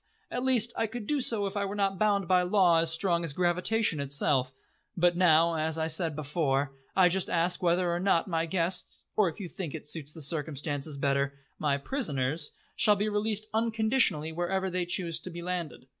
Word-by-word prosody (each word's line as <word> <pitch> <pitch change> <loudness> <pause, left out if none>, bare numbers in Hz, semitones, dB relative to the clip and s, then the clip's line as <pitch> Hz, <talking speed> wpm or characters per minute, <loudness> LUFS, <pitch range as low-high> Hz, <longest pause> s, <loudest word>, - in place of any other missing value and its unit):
At 250 - -2
least 240 -3 +3
I 225 - 0
could 225 0 -7
do 290 +4 0
so 220 -5 +2
if 195 +1 -4
I 205 - 0
were 200 +1 -4
not 195 -2 0
bound 200 -3 +1
by 180 0 +4
law 180 -2 +3
as 165 0 +2
strong 170 0 +1
as 165 -4 0
gravitation 180 +2 +1
itself; 140 -2 +1 0.5
but 175 0 +3
now, 170 -2 +4
as 160 0 0
I 160 - 0
said 160 -1 0
before, 145 -2 -1 0.2
I 185 -2 +6
just 185 +1 0
ask 175 +1 +1
whether 175 0 +2
or 170 - -1
not 185 -2 +2
my 165 -2 -1
guests 175 +1 -2
or, 210 -4 +3
if 160 - -11
you 195 - -5
think 170 -3 -6
it 155 - -8
suits 150 -1 -4
the 160 - -10
circumstances 145 -1 -3
better, 140 0 0 0.2
my 145 -2 +1
prisoners, 150 - -2 0.2
shall 210 - +5
be 205 +1 -1
released 210 0 0
unconditionally 220 - +1
wherever 185 +3 -2
they 180 -1 -2
choose 170 -2 -1
to 185 - -7
be 170 0 -8
landed." 175 -7 -4
175 Hz, 200 wpm, -29 LUFS, 155-195 Hz, 0.5 s, I